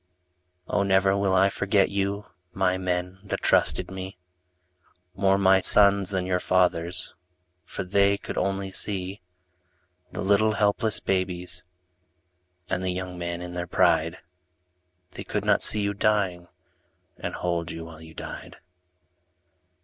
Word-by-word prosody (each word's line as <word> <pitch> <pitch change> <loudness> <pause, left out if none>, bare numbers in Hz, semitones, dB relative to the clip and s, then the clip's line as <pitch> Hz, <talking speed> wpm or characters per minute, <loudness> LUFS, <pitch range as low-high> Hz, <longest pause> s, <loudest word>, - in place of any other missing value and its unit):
Oh, 100 - +1
never 95 0 +3
will 100 -1 +1
I 95 +1 +5
forget 100 0 +2
you, 100 +1 -1 0.3
My 95 -1 +1
men 90 0 -2
that 100 - -4
trusted - - +2
me. 95 0 -7 1.0
More 95 +1 +2
my 95 -1 +5
sons 100 -1 +4
than 95 -2 -1
your 90 -1 0
fathers'. 90 -2 +1 0.5
For - - -5
they 100 +2 +3
could - - -7
only 95 0 -1
see 95 -1 -3 0.9
The - - -5
little 105 +2 +3
helpless 105 +1 +1
babies 90 -2 -2 1.1
And 90 0 -2
the 95 - -1
young 90 0 -4
men 85 0 -4
in 90 0 -7
their 90 0 -4
pride. 85 +1 +2 0.9
They - - -7
could - - -3
not - - +3
see 105 - +2
you 100 0 0
dying. 100 -4 0 0.7
And - - -4
hold 85 -2 -2
you 80 0 -6
while 80 -1 -12
you 80 0 -13
died. - - -8
95 Hz, 135 wpm, -26 LUFS, 90-100 Hz, 1.1 s, I